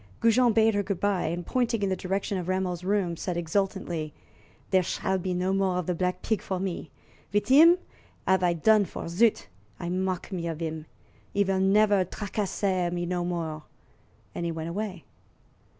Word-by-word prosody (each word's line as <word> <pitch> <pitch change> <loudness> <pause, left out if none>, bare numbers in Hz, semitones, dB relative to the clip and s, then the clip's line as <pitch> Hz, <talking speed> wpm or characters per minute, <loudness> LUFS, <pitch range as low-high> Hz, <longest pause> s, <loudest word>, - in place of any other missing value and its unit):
Goujon 235 +1 +4
bade 220 0 +4
her 205 - +1
good 200 -2 -3
by, 205 -3 +1
and, 170 +2 -3
pointing 240 -4 0
in 195 - +1
the 190 - +1
direction 195 +2 -2
of 180 - -5
Rameau's 185 -2 -1
rooms, 185 -4 0
said 180 -2 -2
exultantly: 175 -3 -2 0.6
"Dere 190 -1 +5
shall 190 +2 -1
be 180 0 -2
no 185 +2 0
more 190 -2 +1
of 180 - -2
the 180 - 0
black 180 +1 -2
pig 220 - 0
for 190 -2 -3
me; 180 -4 -4 0.4
vit 205 +5 0
'im 330 +6 +8 0.5
I 190 - +4
'ave 180 -2 +2
done 210 +5 +4
for. - - -7
Zut! 210 +7 +2 0.3
I 175 - -4
mock 185 +1 -2
me 175 -3 -3
of 160 -2 -4
'im! 160 -1 -4 0.5
'E 200 - +4
vill 190 -1 0
never 200 0 +4
tracasser 190 -2 -2
me 175 0 -2
no 175 0 -1
more." 165 -3 -3 0.7
And - - -4
he 170 - -1
went 160 0 -4
away. 190 -1 -4
185 Hz, 185 wpm, -27 LUFS, 175-205 Hz, 0.7 s, im